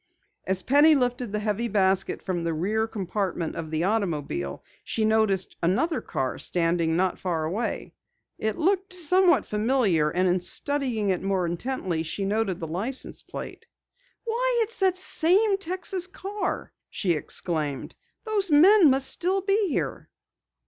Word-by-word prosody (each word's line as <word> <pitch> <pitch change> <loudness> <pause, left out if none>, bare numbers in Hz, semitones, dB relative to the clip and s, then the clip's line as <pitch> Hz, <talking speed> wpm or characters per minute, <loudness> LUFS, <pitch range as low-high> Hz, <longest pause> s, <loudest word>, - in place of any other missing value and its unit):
As 190 -1 0
Penny 295 - +6
lifted 245 -3 -1
the 210 - -1
heavy 210 +2 -1
basket 195 -3 +1
from 175 -3 -2
the 165 -1 -1
rear 215 +7 0
compartment 190 -5 -3
of 160 -1 -5
the 160 +1 -1
automobile, 160 - -2 0.2
she 220 - -1
noticed 215 -4 +1
another 255 - +1
car 130 -1 -3
standing 165 -1 0
not 185 +1 0
far 170 -4 -2
away. 190 +9 -3 0.5
It 220 -1 -1
looked 380 +2 +1
somewhat 365 +1 +3
familiar 210 - +1
and 180 +4 +1
in 180 +1 +2
studying 245 +1 -1
it 185 - 0
more 190 -2 0
intently 175 -1 -2
she 165 +5 -3
noted 200 -3 -1
the 165 - -4
license 210 +12 -5
plate. - - -9 0.6
"Why, 480 +1 +1
it's 450 +2 -5
that 380 -2 +3
same 380 +3 +2
Texas 370 0 -3
car!" 390 +1 -4 0.2
she 185 - -1
exclaimed. 155 -2 -3 0.3
"Those 420 -4 0
men 340 +3 +7
must 265 0 +2
still 375 +3 0
be 400 +2 +1
here." - - -3
215 Hz, 145 wpm, -26 LUFS, -, 0.6 s, men